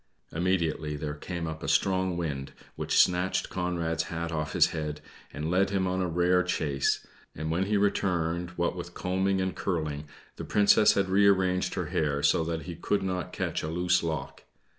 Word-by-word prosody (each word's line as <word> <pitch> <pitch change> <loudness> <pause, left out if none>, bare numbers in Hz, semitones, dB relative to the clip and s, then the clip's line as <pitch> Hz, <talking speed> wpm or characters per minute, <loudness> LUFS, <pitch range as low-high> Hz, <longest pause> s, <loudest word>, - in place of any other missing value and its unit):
Immediately 80 -3 0
there 75 0 -4
came 85 +3 -5
a 80 0 -5
strong 95 -2 +1
wind, 70 -6 -4 0.2
which - - -1
snatched 90 +1 +3
Conrad's 85 -3 -1
hat 85 0 -4
off 75 -2 -3
his - - +5
head, 75 -1 -4 0.3
and 75 +3 -3
led 95 +2 +3
him 95 -1 0
a 95 0 0
rare 90 +2 +3
chase; 75 -6 0 0.3
and 80 +1 -3
when 90 +4 0
he 105 0 +2
returned 90 -4 0
what 85 0 0
with 85 -1 -7
combing 95 +1 0
and 95 0 -1
curling, 75 -5 -2 0.3
the - - -5
Princess 105 0 +5
had 100 -1 +1
rearranged 95 -1 +3
her - - -2
hair, 70 -2 0
so 75 +3 +4
that 80 0 -3
he 85 - -6
could 100 +4 -1
not 90 -3 -3
catch - - -2
a - - -4
loose 90 +2 +2
lock. 80 -2 -4
85 Hz, 175 wpm, -28 LUFS, 80-95 Hz, 0.3 s, his